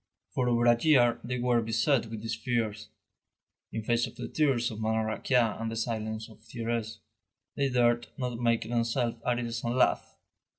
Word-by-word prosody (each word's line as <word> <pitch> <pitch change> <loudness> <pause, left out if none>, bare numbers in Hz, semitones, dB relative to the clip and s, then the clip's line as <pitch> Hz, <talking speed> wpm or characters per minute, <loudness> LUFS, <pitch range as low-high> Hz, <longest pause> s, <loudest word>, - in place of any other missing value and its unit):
For 125 -1 0
over 120 0 +2
a 120 0 +4
year 125 -7 +4
they 125 +1 -3
were 120 -1 +2
beset 115 +3 +1
with 110 -1 -7
these 115 0 -2
fears. 110 -3 -2 0.8
In 110 - -4
face 120 +1 +1
of - - -12
the 125 - -5
tears 135 -6 +1
of 110 0 -7
Madame 110 0 +1
Raquin 115 +1 +1
and 115 - -2
the - - -4
silence 110 -1 -3
of 110 - -16
Thérèse, 115 0 -4 0.6
they 140 -1 +1
dared 120 -1 +2
not 125 -3 -3
make 115 -1 +2
themselves 120 +1 0
at 125 -1 +1
ease 115 -1 -4
and 120 +1 -1
laugh. 95 - +1
115 Hz, 180 wpm, -29 LUFS, 110-120 Hz, 0.8 s, a